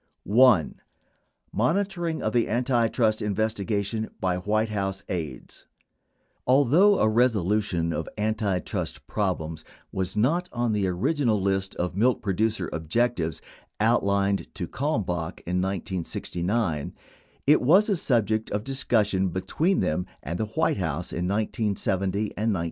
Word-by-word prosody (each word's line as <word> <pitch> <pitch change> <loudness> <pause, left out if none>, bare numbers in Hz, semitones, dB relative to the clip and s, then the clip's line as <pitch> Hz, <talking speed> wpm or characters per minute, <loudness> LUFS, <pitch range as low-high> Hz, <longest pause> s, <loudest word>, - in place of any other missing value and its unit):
1. 115 - +4 0.7
MONITORING 170 - 0
OF 110 - -1
THE 120 -2 +2
ANTITRUST 115 -2 +1
INVESTIGATION 105 +1 -1
BY 90 -1 0
WHITE 110 +4 0
HOUSE 95 -2 -2
AIDES 80 -8 -6 0.8
Although 145 - +5
a 110 - +3
resolution 105 -6 +1
of 80 - -3
antitrust 105 -4 -2
problems 80 -6 -2 0.3
was 95 +1 -3
not 165 +11 +1
on 120 -2 0
the 100 -2 +1
original 110 - +1
list 95 0 -1
of 90 0 -2
milk 120 +5 +2
producer 110 +3 0
objectives 80 - -1 0.4
outlined 100 -3 +2
to 90 -3 -4
Kalmbach 95 - -2
in 90 +1 -1
1969, 90 -1 -2 0.5
it 150 +2 +5
was 185 +11 +5
a 205 - +2
subject 110 - +1
of 105 - -1
some 135 +5 -5
discussion 105 -7 +1
between 95 - 0
them 90 +4 -1 0.2
and 85 +5 -4
the 110 - 0
White 110 0 0
House 85 -2 -2
in 90 +1 -1
1970 100 -2 0 0.3
and 110 +1 0
1971. 90 - -1
105 Hz, 125 wpm, -26 LUFS, 95-120 Hz, 0.8 s, Although